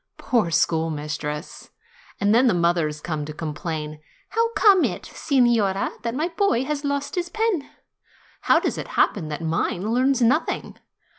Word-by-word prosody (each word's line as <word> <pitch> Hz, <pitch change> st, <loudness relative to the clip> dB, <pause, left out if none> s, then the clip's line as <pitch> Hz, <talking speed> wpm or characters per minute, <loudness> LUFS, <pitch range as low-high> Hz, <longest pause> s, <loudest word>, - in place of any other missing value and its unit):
Poor 230 Hz, -8 st, +1 dB
schoolmistress! 150 Hz, -2 st, -2 dB, 0.5 s
And 205 Hz, +1 st, +3 dB
then 250 Hz, +3 st, +5 dB
the 220 Hz, -, +3 dB
mothers 170 Hz, -3 st, +1 dB
come 155 Hz, -2 st, -3 dB
to 155 Hz, -, -7 dB
complain: 155 Hz, -1 st, -5 dB, 0.3 s
"How 460 Hz, +1 st, +1 dB
comes 395 Hz, -6 st, +5 dB
it, -, -, -6 dB
sig 275 Hz, -4 st, +1 dB
norina, 205 Hz, -5 st, +1 dB
that 235 Hz, 0 st, -3 dB
my 315 Hz, +5 st, -1 dB
boy 335 Hz, -, +1 dB
has 295 Hz, +1 st, -3 dB
lost 280 Hz, 0 st, -2 dB
his 350 Hz, -1 st, -2 dB
pen? 435 Hz, -9 st, -1 dB, 0.7 s
How -, -, +4 dB
does -, -, -2 dB
it -, -, -5 dB
happen 175 Hz, -7 st, +2 dB
that 155 Hz, +2 st, -5 dB
mine 175 Hz, +5 st, -1 dB
learns 260 Hz, +1 st, +2 dB
nothing 250 Hz, +7 st, 0 dB
220 Hz, 155 wpm, -23 LUFS, -, 0.7 s, then